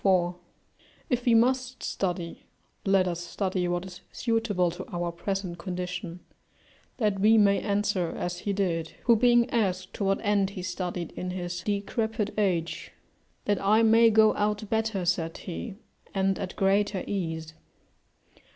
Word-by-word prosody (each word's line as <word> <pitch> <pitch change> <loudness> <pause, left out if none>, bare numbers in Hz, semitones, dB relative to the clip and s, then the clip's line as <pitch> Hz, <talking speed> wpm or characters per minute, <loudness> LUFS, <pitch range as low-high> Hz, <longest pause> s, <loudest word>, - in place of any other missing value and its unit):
] - - -33
If 245 -1 0
we 235 -2 +5
must 255 +2 +2
study, 175 -3 -3 0.4
let 195 -1 +4
us 175 -1 -2
study 185 0 -2
what 175 +1 -1
is 180 -1 -10
suitable 215 -7 0
to 180 +2 -7
our 175 -1 -2
present 185 0 -4
condition, 180 0 -5 0.8
that 210 -5 +1
we 220 +3 +6
may 200 -2 +5
answer 200 -4 0
as 175 0 -3
he 205 - -2
did, 170 -5 -1
who 235 - +5
being 240 +1 +4
asked 185 -5 0
to - - -3
what 195 0 +2
end 205 -2 +2
he 180 - -4
studied 180 -2 -3
in 180 - -5
his 175 -1 -4
decrepit 210 +2 -1
age, 180 -5 -1 0.5
"that 205 -1 +1
I 215 +3 +4
may 225 +1 +6
go 215 0 +5
out 210 +1 -1
better," 220 -4 0
said 170 -2 0
he, 190 +4 -6 0.4
"and 195 0 +1
at 190 - -5
greater 200 0 +2
ease." 160 -5 -3
195 Hz, 150 wpm, -27 LUFS, 180-215 Hz, 0.8 s, we